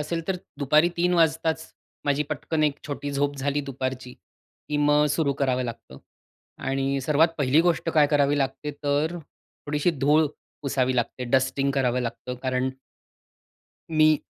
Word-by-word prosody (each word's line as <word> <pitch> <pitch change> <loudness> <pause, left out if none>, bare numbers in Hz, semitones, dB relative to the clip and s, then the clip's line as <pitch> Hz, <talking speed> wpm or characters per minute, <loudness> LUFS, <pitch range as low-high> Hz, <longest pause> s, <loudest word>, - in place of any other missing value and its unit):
असेल, 165 +2 -3
तर 190 - +1 0.2
दुपारी 150 +4 +4
3 175 +1 +2
वाजताच 160 -1 +2 0.4
माझी 145 0 +2
पटकन 155 -1 -1
एक 145 -1 0
छोटी 145 -1 -4
झोप 145 +1 0
झाली 140 +1 -1
दुपारची 130 -2 -5 0.6
की 150 - -1
मग 145 0 +4
सुरु 145 -2 +1
करावं 130 -2 0
लागतं. 115 - -8 0.6
आणि 135 +1 -1
सर्वात 150 +4 +3
पहिली 145 +3 +4
गोष्ट 170 -1 +1
काय 150 -2 +5
करावी 145 -1 +2
लागते, 135 +2 -2
तर 150 +4 0 0.5
थोडीशी 150 +4 +1
धूळ 150 +1 +3 0.4
पुसावी 130 -2 0
लागते, 125 +1 -1
डस्टिंग 130 +2 +1
करावं 125 -2 +1
लागतं. 125 +1 -4
कारण 130 0 0 1.2
मी 155 -1 +5
145 Hz, 145 wpm, -25 LUFS, 130-155 Hz, 1.2 s, काय